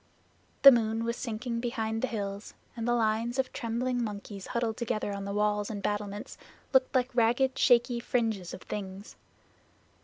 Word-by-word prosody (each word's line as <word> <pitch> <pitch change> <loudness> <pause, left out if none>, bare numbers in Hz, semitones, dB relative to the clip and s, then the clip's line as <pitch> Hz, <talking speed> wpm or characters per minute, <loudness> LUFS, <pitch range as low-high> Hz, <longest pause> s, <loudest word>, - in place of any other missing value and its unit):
The 275 - +13
moon 225 -2 +1
was 235 0 -1
sinking 230 0 -3
behind 225 -2 -2
the 260 - +1
hills 200 -3 -5 0.2
and 230 -1 -3
the 240 - +3
lines 230 +2 0
of 265 -1 -1
trembling 245 0 -1
monkeys 205 -2 -6
huddled 235 -2 -1
together 215 -3 -2
on 200 0 -5
the 200 - -4
walls 210 0 0
and 205 -3 -5
battlements 205 0 -3 0.3
looked 265 0 +3
like 250 0 +1
ragged 245 +3 +2
shaky 240 -1 +4
fringes 225 -7 -1
of - - -9
things. 195 0 -7
225 Hz, 160 wpm, -29 LUFS, 210-240 Hz, 0.3 s, The